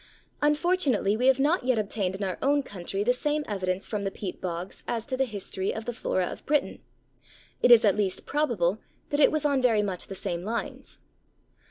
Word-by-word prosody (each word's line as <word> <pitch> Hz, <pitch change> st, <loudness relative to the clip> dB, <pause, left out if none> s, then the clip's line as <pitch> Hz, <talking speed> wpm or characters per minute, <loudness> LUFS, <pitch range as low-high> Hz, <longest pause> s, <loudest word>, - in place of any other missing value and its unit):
Unfortunately 295 Hz, -, +2 dB
we 250 Hz, +4 st, +1 dB
have 265 Hz, 0 st, +5 dB
not 295 Hz, +3 st, +2 dB
yet 255 Hz, -1 st, +2 dB
obtained 200 Hz, -3 st, -1 dB
in 195 Hz, -, -4 dB
our 185 Hz, -2 st, -3 dB
own 285 Hz, +1 st, +2 dB
country 195 Hz, -2 st, -4 dB
the 245 Hz, +3 st, +3 dB
same 295 Hz, +4 st, -1 dB
evidence 185 Hz, -2 st, -2 dB
from 210 Hz, -2 st, -3 dB
the 195 Hz, -, 0 dB
peat 195 Hz, -1 st, -7 dB
bogs 180 Hz, +1 st, -5 dB
as 230 Hz, -1 st, -2 dB
to 260 Hz, -, -2 dB
the 265 Hz, +1 st, +1 dB
history 195 Hz, -3 st, -3 dB
of 220 Hz, 0 st, -6 dB
the 240 Hz, -, -3 dB
flora 185 Hz, -5 st, -1 dB
of -, -, -7 dB
Britain. 295 Hz, 0 st, 0 dB, 0.8 s
It -, -, +4 dB
is 235 Hz, -2 st, +8 dB
at 200 Hz, -, +4 dB
least 200 Hz, -3 st, -1 dB
probable 220 Hz, -, 0 dB, 0.3 s
that 290 Hz, -, 0 dB
it 295 Hz, -, +6 dB
was 310 Hz, -1 st, -1 dB
on 280 Hz, -2 st, +2 dB
very 225 Hz, -4 st, +3 dB
much 190 Hz, -3 st, -3 dB
the 195 Hz, -, -7 dB
same 175 Hz, -1 st, -3 dB
lines. 230 Hz, +4 st, -5 dB
220 Hz, 205 wpm, -27 LUFS, 195-270 Hz, 0.8 s, is